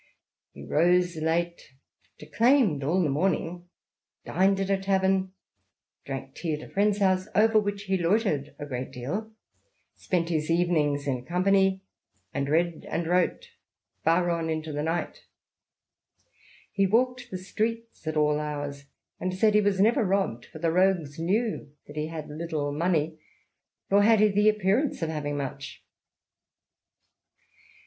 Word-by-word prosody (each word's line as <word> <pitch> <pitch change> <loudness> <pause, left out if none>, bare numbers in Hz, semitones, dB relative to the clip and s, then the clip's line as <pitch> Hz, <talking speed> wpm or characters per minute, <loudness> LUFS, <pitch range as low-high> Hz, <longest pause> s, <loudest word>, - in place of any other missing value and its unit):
He 70 - -11
rose 175 - +2
late, 165 -2 -2 0.4
^'declaimed 230 - +2
all 175 +6 +2
the 155 - +1
morning/' 175 +3 -1 0.6
dined 195 +2 +2
at 195 0 -1
a 195 - +3
tavern, 190 -1 +1 0.7
drank 135 -1 -6
tea 160 -3 -3
at 150 - -9
a - - -20
friend's 205 +1 +2
house, 190 -1 +2
" - - -29
over 220 +1 +5
which 205 -1 -3
he 190 -2 0
loitered 170 - 0
a 145 - -6
great 130 -2 -5
while," 190 - -4 0.6
spent 170 -2 -1
his 155 -2 -1
evenings 155 -4 +1
in 130 -3 -2
company, 190 +3 +2 0.5
and 140 0 -2
read 170 +1 +1
and 165 +2 -2
wrote 175 +1 0 0.5
far 175 +2 +3
on 165 -1 -1
into 155 -1 -3
the 145 - -2
night 165 +3 -3 0.8
" - - -31
He 195 -1 +2
walked 245 +3 +1
the 185 - -4
streets 225 +1 -4
at 155 0 -1
all 150 0 +2
hours, 145 -2 -5 0.3
and 185 - -2
said 215 +2 +3
he 210 - +5
was 200 -2 +1
never 225 +3 +4
robbed, 190 - -1
for - - -11
the 165 +1 0
rogues 175 -5 +1
knew 195 -3 -1
that 145 - -12
he 155 0 -2
had 160 -2 -6
little 150 -2 -3
money, 160 0 0 0.7
nor 200 +1 +6
had 220 +1 +5
he 215 0 +5
the 205 +1 +4
appearance 210 - +1
of 160 - -1
having 145 -2 -3
much." 140 0 -6
175 Hz, 150 wpm, -27 LUFS, 150-195 Hz, 0.8 s, nor